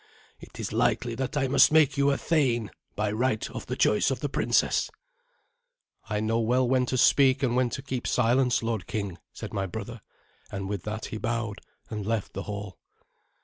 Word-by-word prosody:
It -, -, -13 dB
is -, -, -4 dB
likely 120 Hz, -1 st, +1 dB
that 135 Hz, +5 st, -3 dB
I 135 Hz, -2 st, +1 dB
must 135 Hz, +2 st, +5 dB
make 155 Hz, -3 st, +4 dB
you 140 Hz, 0 st, +3 dB
a 140 Hz, -, +2 dB
thane, 125 Hz, -9 st, +1 dB, 0.2 s
by 105 Hz, 0 st, 0 dB
right 110 Hz, 0 st, 0 dB
of -, -, -7 dB
the -, -, -2 dB
choice 105 Hz, -, +3 dB
of 135 Hz, -, -2 dB
the 145 Hz, -, -2 dB
princess." -, -, +1 dB, 1.2 s
"I 105 Hz, -1 st, 0 dB
know 110 Hz, +2 st, 0 dB
well 125 Hz, +3 st, +2 dB
when 125 Hz, 0 st, +2 dB
to 130 Hz, -, -1 dB
speak 135 Hz, +1 st, +4 dB
and 120 Hz, -2 st, +1 dB
when 125 Hz, -1 st, +2 dB
to 135 Hz, -, -5 dB
keep 130 Hz, -3 st, -3 dB
silence, 125 Hz, +1 st, +2 dB
lord 115 Hz, -5 st, -2 dB
king," 100 Hz, -5 st, -4 dB
said -, -, -8 dB
my 95 Hz, 0 st, -1 dB
brother, 110 Hz, +4 st, -7 dB, 0.5 s
and 95 Hz, -1 st, -4 dB
with 100 Hz, -3 st, -4 dB
that 110 Hz, +1 st, -4 dB
he -, -, -2 dB
bowed 115 Hz, -2 st, -2 dB, 0.3 s
and 105 Hz, -2 st, -3 dB
left 110 Hz, 0 st, -2 dB
the 95 Hz, -, -4 dB
hall. 100 Hz, -2 st, -6 dB
115 Hz, 190 wpm, -27 LUFS, 105-130 Hz, 1.2 s, must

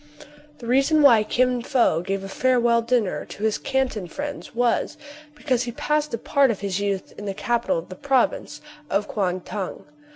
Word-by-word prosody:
The 235 Hz, -, -11 dB
reason 275 Hz, +5 st, +3 dB
why 235 Hz, -6 st, +7 dB
Kin 250 Hz, +3 st, +1 dB
Fo 235 Hz, -9 st, +2 dB
gave 195 Hz, +2 st, -3 dB
a -, -, -5 dB
farewell 240 Hz, +1 st, +2 dB
dinner 230 Hz, -4 st, 0 dB
to 205 Hz, -, -9 dB
his 220 Hz, -1 st, +1 dB
Canton 260 Hz, -8 st, -1 dB
friends 285 Hz, -, -6 dB
was, 240 Hz, 0 st, +1 dB, 0.4 s
because 260 Hz, -5 st, 0 dB
he 245 Hz, -1 st, -3 dB
passed 300 Hz, +2 st, -1 dB
a 230 Hz, -, -2 dB
part 275 Hz, +4 st, +2 dB
of 215 Hz, -4 st, -2 dB
his 200 Hz, -1 st, -2 dB
youth 200 Hz, -2 st, -2 dB
in 205 Hz, -, -7 dB
the 195 Hz, -1 st, -3 dB
capital 235 Hz, -2 st, 0 dB
of 165 Hz, -, -6 dB
the 185 Hz, -, -8 dB
province 270 Hz, +4 st, 0 dB, 0.3 s
of 205 Hz, +1 st, 0 dB
Kuang 185 Hz, -3 st, -1 dB
Tung. 195 Hz, +1 st, -6 dB
235 Hz, 185 wpm, -23 LUFS, 200-260 Hz, 0.4 s, why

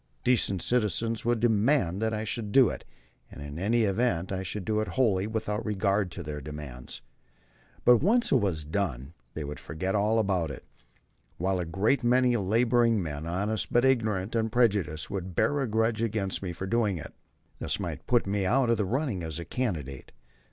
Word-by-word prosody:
Decent 110 Hz, -7 st, +1 dB
citizens 115 Hz, -1 st, 0 dB
would 120 Hz, -1 st, +2 dB
demand 110 Hz, -, +2 dB
that 110 Hz, 0 st, +1 dB
I 110 Hz, 0 st, -2 dB
should 110 Hz, -1 st, -4 dB
do 130 Hz, -1 st, +6 dB
it, -, -, -7 dB, 0.4 s
and -, -, -12 dB
in 75 Hz, +2 st, -7 dB
any 115 Hz, +5 st, +2 dB
event 100 Hz, -4 st, 0 dB
I 95 Hz, -1 st, -2 dB
should 95 Hz, +1 st, -5 dB
do 110 Hz, 0 st, +1 dB
it 110 Hz, -, -3 dB
wholly 105 Hz, -6 st, +2 dB
without 110 Hz, -1 st, -2 dB
regard 100 Hz, -2 st, 0 dB
to 85 Hz, -, -6 dB
their 75 Hz, -1 st, -5 dB
demands. 70 Hz, -5 st, -8 dB, 0.8 s
But, 125 Hz, 0 st, +7 dB
once 235 Hz, -, +2 dB
it -, -, +6 dB
was 90 Hz, -, -1 dB
done, 75 Hz, -5 st, -3 dB, 0.2 s
they 80 Hz, -, -3 dB
would 75 Hz, +1 st, -6 dB
forget 95 Hz, +4 st, -3 dB
all 105 Hz, +2 st, +2 dB
about 95 Hz, -7 st, +1 dB
it, 70 Hz, -, -8 dB, 0.7 s
while 95 Hz, +2 st, 0 dB
a 90 Hz, -, -2 dB
great 105 Hz, +10 st, +1 dB
many 125 Hz, 0 st, +3 dB
laboring 115 Hz, +2 st, +2 dB
men, 80 Hz, -3 st, -4 dB
honest 100 Hz, +5 st, -2 dB
but 120 Hz, +2 st, +3 dB
ignorant 110 Hz, -6 st, +1 dB
and 110 Hz, -1 st, 0 dB
prejudiced, 100 Hz, -11 st, +1 dB
would 95 Hz, -2 st, -5 dB
bear 145 Hz, -, +2 dB
a 135 Hz, -, 0 dB
grudge 110 Hz, 0 st, +1 dB
against 105 Hz, -4 st, -1 dB
me 95 Hz, -3 st, -3 dB
for 85 Hz, +3 st, -5 dB
doing 105 Hz, -2 st, +1 dB
it. 80 Hz, -, -8 dB, 0.5 s
This -, -, -1 dB
might -, -, -5 dB
put 120 Hz, -1 st, +3 dB
me 100 Hz, 0 st, -1 dB
out 120 Hz, +5 st, +2 dB
of 115 Hz, -, +2 dB
the 105 Hz, -, 0 dB
running 125 Hz, -, -1 dB
as 80 Hz, -2 st, -5 dB
a 85 Hz, -, -5 dB
candidate. 80 Hz, -, -4 dB
105 Hz, 190 wpm, -28 LUFS, 90-115 Hz, 0.8 s, But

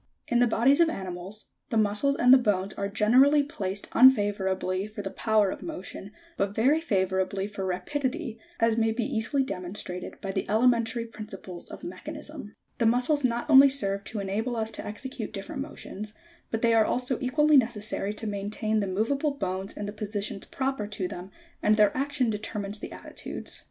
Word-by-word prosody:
In 240 Hz, -, +2 dB
the 245 Hz, -, +5 dB
bodies 250 Hz, +6 st, +3 dB
of 335 Hz, -1 st, +5 dB
animals, 190 Hz, -, -6 dB, 0.2 s
the 225 Hz, -, 0 dB
muscles 215 Hz, +6 st, +3 dB
and 250 Hz, -1 st, +6 dB
the 265 Hz, -, +8 dB
bones 200 Hz, -4 st, +1 dB
are 200 Hz, 0 st, -3 dB
generally 255 Hz, +8 st, +5 dB
placed 200 Hz, -8 st, -4 dB
unfavourably 200 Hz, -5 st, +3 dB
for 210 Hz, -1 st, -7 dB
the 195 Hz, -, -4 dB
power 215 Hz, -3 st, +2 dB
of -, -, -7 dB
motion, 200 Hz, -, -7 dB, 0.3 s
but 200 Hz, +1 st, -1 dB
very 275 Hz, +8 st, +3 dB
favourably 190 Hz, -, 0 dB
for 200 Hz, -2 st, -4 dB
rapidity, 255 Hz, -, -3 dB, 0.2 s
as 230 Hz, 0 st, +2 dB
may 225 Hz, -1 st, +2 dB
be 235 Hz, +2 st, -1 dB
easily 270 Hz, +7 st, +1 dB
demonstrated 180 Hz, -4 st, -6 dB
by 195 Hz, -, -4 dB
the -, -, -3 dB
elementary 230 Hz, +1 st, +2 dB
principles 195 Hz, -5 st, -8 dB
of -, -, -10 dB
mechanism. 295 Hz, -, -7 dB
71. -, -, -29 dB, 0.3 s
The 235 Hz, -, +2 dB
muscles 250 Hz, +5 st, +3 dB
not 240 Hz, -1 st, 0 dB
only 275 Hz, -2 st, +8 dB
serve 200 Hz, -7 st, +2 dB
to 220 Hz, -, -4 dB
enable 210 Hz, +5 st, -2 dB
us 220 Hz, -1 st, -1 dB
to -, -, -5 dB
execute 220 Hz, +2 st, -5 dB
dif 195 Hz, -2 st, -6 dB
ferent 300 Hz, -, -5 dB
motions, 215 Hz, -7 st, -7 dB, 0.3 s
but 225 Hz, +1 st, -3 dB
they 230 Hz, 0 st, +4 dB
are 225 Hz, -1 st, +5 dB
also 250 Hz, +2 st, 0 dB
equally 295 Hz, +4 st, +3 dB
necessary 220 Hz, -4 st, 0 dB
to 215 Hz, -, -5 dB
maintain 210 Hz, +1 st, -1 dB
the 200 Hz, -, -1 dB
moveable 275 Hz, +9 st, 0 dB
bones 190 Hz, -2 st, -3 dB
in 210 Hz, -, -4 dB
the 205 Hz, -, -5 dB
positions 210 Hz, -2 st, -4 dB
proper 265 Hz, -6 st, -2 dB
to 200 Hz, -3 st, -3 dB
them, 180 Hz, +1 st, -8 dB, 0.3 s
and 215 Hz, -, +4 dB
their 210 Hz, -1 st, +4 dB
action 275 Hz, -3 st, 0 dB
determines 210 Hz, -1 st, -4 dB
the -, -, -7 dB
attitudes. -, -, -6 dB
220 Hz, 180 wpm, -27 LUFS, 200-255 Hz, 0.3 s, the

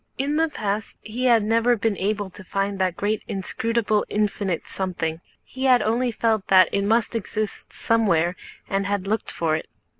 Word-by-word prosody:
In 280 Hz, +3 st, 0 dB
the 325 Hz, 0 st, +2 dB
past 210 Hz, -5 st, -3 dB
he 240 Hz, +4 st, -3 dB
had 235 Hz, -3 st, +5 dB
never 230 Hz, +3 st, +3 dB
been 220 Hz, -1 st, 0 dB
able 200 Hz, 0 st, -2 dB
to 190 Hz, -, -12 dB
find 195 Hz, +1 st, -2 dB
that 185 Hz, -2 st, 0 dB
great 210 Hz, +1 st, 0 dB
inscrutable 215 Hz, +2 st, 0 dB
infinite 205 Hz, -4 st, -1 dB
something. 170 Hz, -4 st, -3 dB, 0.2 s
He 260 Hz, +1 st, -5 dB
had 255 Hz, -2 st, +5 dB
only 240 Hz, +3 st, +1 dB
felt 220 Hz, -3 st, 0 dB
that 185 Hz, -1 st, +6 dB
it 200 Hz, -, +1 dB
must 225 Hz, +3 st, +2 dB
exist 215 Hz, -1 st, -3 dB
somewhere 180 Hz, -7 st, +2 dB, 0.3 s
and 195 Hz, 0 st, -1 dB
had 200 Hz, -1 st, -1 dB
looked 215 Hz, +2 st, -1 dB
for 160 Hz, -2 st, 0 dB
it. 155 Hz, -, -5 dB
210 Hz, 175 wpm, -24 LUFS, 195-230 Hz, 0.3 s, that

